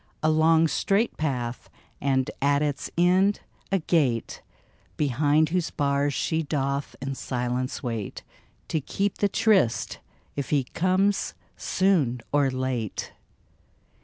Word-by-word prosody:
A 155 - +4
long, 160 +1 +4
straight 200 +9 +1
path 125 -6 -3 0.2
— - - -34
and, 130 -1 +1
at 140 +1 +3
its 145 -2 -2
end, 185 +4 +3 0.3
a 195 - +3
gate 145 -9 0 0.6
Behind 150 +2 +2
whose 180 0 0
bars 140 0 +1
she 160 -1 0
doth 140 -2 -2
in 135 0 -2
silence 125 0 -3
wait 115 -5 -4 0.5
To 160 - 0
keep 195 +8 -2
the 205 - +2
tryst, 185 - +2 0.4
if 140 -2 -3
he 145 -3 +2
comes 185 +8 +1 0.2
soon 165 -11 +1
or 145 -2 +3
late 130 -4 -3
145 Hz, 125 wpm, -26 LUFS, 130-170 Hz, 0.6 s, A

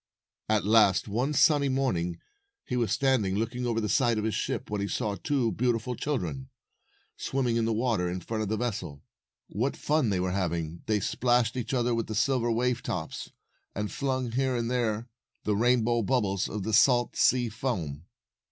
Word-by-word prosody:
At 110 -2 +2
last, 105 -3 +4
one 120 +8 -1
sunny 145 -1 +4
morning, 90 -11 -1 0.5
he 125 - -3
was 120 -5 0
standing 125 -9 +2
256 - - 0 0.2
looking 125 - -1
over 115 -1 0
the 105 - -1
side 120 -2 +2
of 105 - -1
the 110 - 0
ship, 105 - -3
when 105 -1 -1
he 100 - -1
saw 105 +1 -1
two 120 +3 0
beautiful 120 0 0
children, 135 -1 -3 0.7
swimming 130 -3 -1
in 115 -1 +1
the 115 - +1
water 110 -6 0
in 90 +1 -3
front 110 +5 -4
of 105 - -2
the 110 - 0
vessel. 95 -12 -4 0.5
What 125 +8 -1
fun 150 -5 +1
they 95 -3 0
were 90 0 0
hav 90 -3 0
ing! 85 0 -5
They 105 -2 +1
splashed 120 +2 +1
each 120 -2 -3
other 120 -1 +1
with 115 -1 -1
the 110 - -4
silver 120 +1 +1
wave 125 +1 0
tops, - - -4 0.5
and 105 +1 -3
flung 130 -3 -2
here 130 +1 0
and 120 0 -1
there 115 -2 -1 0.4
the 105 - +1
rainbow 120 +1 +2
bubbles 100 -4 0
of 105 -2 -4
the 110 - -3
salt 120 +2 +4
sea 125 -2 +3
foam. 95 - -3
115 Hz, 190 wpm, -28 LUFS, 105-125 Hz, 0.7 s, last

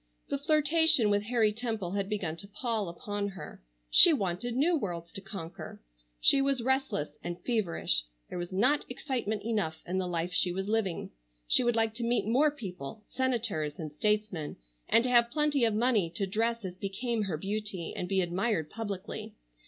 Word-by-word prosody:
The 280 - -1
flirtation 305 -5 +4
with 205 0 +3
Harry 225 -2 +2
Temple 220 -5 -3
had 200 0 -2
begun 190 -7 -2
to 200 - -9
pall 215 -2 -2
upon 200 +4 -4
her. 195 - -9 0.3
She 335 - +10
wanted 210 - -2
new 320 +7 +3
worlds 170 - -4
to 195 - -6
conquer. 190 -4 -8 0.4
She 275 - +5
was 275 -3 +1
restless 265 - -1
and 175 0 -5
feverish. 175 - +1 0.2
There - - -5
was 175 +1 -5
not 250 +10 +3
excitement 250 -5 -3
enough 210 -8 -2
in 185 +2 -1
the 185 - -1
life 175 0 -2
she 180 +1 +3
was 190 +2 -3
living. 210 -5 -1 0.4
She - - +4
would 240 -1 +2
like 225 -1 +2
to 235 +1 -5
meet 235 +1 +1
more 260 +8 +4
people, 205 - -8
senators 225 - -1
and 155 -3 -6
statesmen—and 160 - -1
to 250 - 0
have 235 -1 +5
plenty 295 -2 +2
of 220 -2 +1
money 220 -6 +2
to 195 - 0
dress 225 +3 -1
as 180 - -4
became 210 +5 -2
her 175 -5 -2
beauty, 195 -1 -4
and 180 - -4
be 190 -1 +2
admired 175 -2 -1
publicly. 205 -4 -6
210 Hz, 175 wpm, -30 LUFS, 180-240 Hz, 0.4 s, She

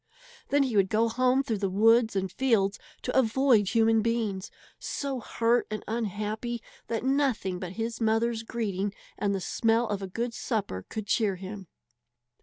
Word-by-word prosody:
Then 285 0 +4
he 255 -5 -2
would 195 -2 +4
go 225 +3 +2
home 255 +3 +2
through 225 -6 -2
the 195 -1 0
woods 225 +3 +4
and 190 -1 -1
fields 215 -6 +1 0.2
to 250 - -2
avoid 245 -4 +4
human 225 +1 +4
beings, 215 -4 -1 0.3
so 275 -2 -3
hurt 235 +1 +1
and 215 -1 -4
unhappy 220 +1 -3 0.2
that 230 -1 -2
nothing 265 -9 +1
but 180 -1 -6
his 230 +3 -4
mother's 225 +1 +1
greeting 205 -4 -3 0.2
and 200 -1 0
the - - -1
smell 225 +5 +1
of 205 -1 -2
a 195 - -4
good 230 +5 -3
supper 205 - -3
could 215 -2 -4
cheer 205 -2 +1
him. 190 +1 -8
225 Hz, 165 wpm, -28 LUFS, 200-235 Hz, 0.3 s, Then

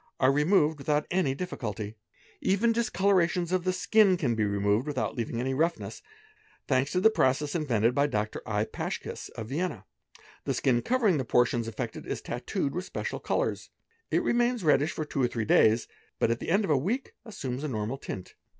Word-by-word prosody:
are 130 0 +5
removed 150 +1 +3
without 150 +1 0
an} 180 -6 +2
difficulty; 115 - -4 0.5
even 205 +5 +2
discolourations 190 -6 +1
of 185 -1 0
the 185 - +3
skin 190 +1 +4
can 140 -9 0
be 110 -1 0
removed 100 +5 +1
without 140 -3 -2
leaving 115 0 -3
any 130 +2 -1
roughness, 165 +5 -1 0.7
thanks 135 +1 +1
to 180 - +1
the 220 +4 +5
process 145 -4 +1
invented 120 -8 +1
by 140 +2 +2
Dr. 110 -4 -2
I. 105 0 -1
Paschki - - -5
of 110 - -5
Vienna: 145 - -3 0.6
the - - -1
skin 120 -3 +2
covering 225 - +2
the - - 0
portions 120 -1 +2
affected 115 - -5
is - - -3
tattooed 140 - -3
wit 180 - -3
special - - -4
colours, - - -1 0.4
it - - +1
remains 240 -2 +1
reddish 150 0 +3
for 155 - -4
two 140 - -2
or 125 - +4
three 115 -2 -3
days, 110 +2 +4 0.3
but 115 - +2
at 115 - -1
the - - -5
er 200 +4 +3
of 195 - 0
a 145 - +4
week 215 - -2
assumes 135 - -5
a - - -1
normal 115 +1 -3
tint. 95 -8 -7
145 Hz, 185 wpm, -28 LUFS, 120-185 Hz, 0.7 s, are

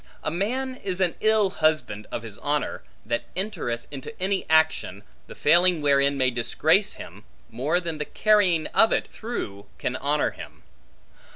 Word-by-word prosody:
A - - -1
man 255 +9 -2
is 190 -4 -4
an 180 -3 +2
ill 215 -3 +3
husband 155 - 0
of 115 - -4
his 110 -3 -8
honor, 145 -1 -2 0.2
that 120 +2 -2
entereth 120 - -3
into 145 - -8
any 190 +1 -1
action, 160 -11 +2 0.2
the - - -11
failing 175 +3 +4
wherein 140 -1 +3
may 130 -1 +2
disgrace 120 -1 +2
him, - - -11 0.3
more 145 +9 0
than 165 -3 -4
the 150 - -2
carrying 190 -7 +3
of 225 - +6
it - - 0
through, 100 - -6
can 125 - -2
honor 145 +3 0
him. - - -12
160 Hz, 160 wpm, -25 LUFS, 130-190 Hz, 0.3 s, of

